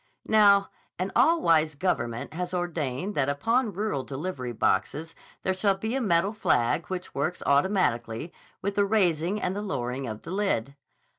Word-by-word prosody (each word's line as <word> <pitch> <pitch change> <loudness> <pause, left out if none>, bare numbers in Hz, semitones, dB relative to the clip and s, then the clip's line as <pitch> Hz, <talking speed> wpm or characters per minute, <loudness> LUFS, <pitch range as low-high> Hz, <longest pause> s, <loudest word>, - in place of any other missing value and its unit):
Now, 200 -2 +5 0.3
an 185 +2 -2
all 335 0 +4
wise 155 -2 +3
government 120 -8 -2
has 180 +2 -3
ordained 170 0 -2
that 140 -4 +1
upon 225 - +1
rural 200 -8 -2
delivery 135 -3 -5
boxes 145 +9 0 0.3
there 190 - +1
shall 195 +1 +1
be 220 +4 -3
a 270 - 0
metal 195 -1 +2
flag 160 - +1
which 185 -1 -5
works 155 +6 -2
automatically 140 - +1 0.3
with 200 +1 -1
the 205 0 +2
raising 185 -2 +2
and 185 -1 -2
the 205 - -3
lowering 130 -9 -3
of 110 -1 -6
the 165 - -7
lid. 185 - -1
175 Hz, 160 wpm, -27 LUFS, 140-200 Hz, 0.3 s, Now